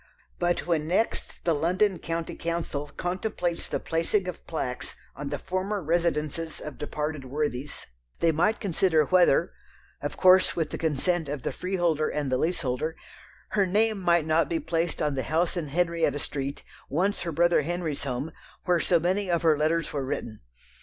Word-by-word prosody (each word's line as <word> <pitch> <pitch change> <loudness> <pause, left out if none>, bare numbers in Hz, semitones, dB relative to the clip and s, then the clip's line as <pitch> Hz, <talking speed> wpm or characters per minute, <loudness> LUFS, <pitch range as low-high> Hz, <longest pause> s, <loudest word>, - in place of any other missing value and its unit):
But 175 0 +1
when 160 -3 0
next 190 +7 -1
the 170 - +3
London 180 +5 +2
County 165 0 -3
Council 165 -3 -3
contemplates 175 +1 -2
the - - -2
placing 165 +4 0
of 180 - -7
plaques 130 -6 -4 0.2
on 140 0 -5
the 145 - -2
former 185 +7 -2
residences 165 -1 0
of 150 -3 -8
departed 150 -1 -3
worthies 140 0 -3 0.3
they 165 - +4
might 180 +8 +2
consider 175 -5 +2
whether 180 -3 +4 0.5
of 145 - -4
course 185 0 +6
with 160 -3 -1
the - - -4
consent 160 +1 0
of 140 -3 -4
the - - -1
freeholder 175 -5 0
and 145 -3 -2
the 130 - +2
leaseholder 155 -2 -1 0.5
her 200 -3 +2
name 215 +2 +2
might 170 -3 +3
not 160 +1 +2
be 165 - 0
placed 165 0 -1
on 150 -1 +1
the 135 - -1
house 165 +7 +1
in 170 -4 -2
Henrietta 165 -1 +1
Street, 140 -1 -3 0.3
once 185 +8 +1
her 170 - -2
brother 175 +1 +4
Henry's 165 -1 -2
home, 140 +3 -3 0.3
where 175 -1 +3
so 170 0 +3
many 185 +4 0
of 170 -1 +1
her 160 -2 +5
letters 155 +2 0
were 140 -2 -1
written. 115 -4 -4
165 Hz, 170 wpm, -27 LUFS, 150-175 Hz, 0.5 s, course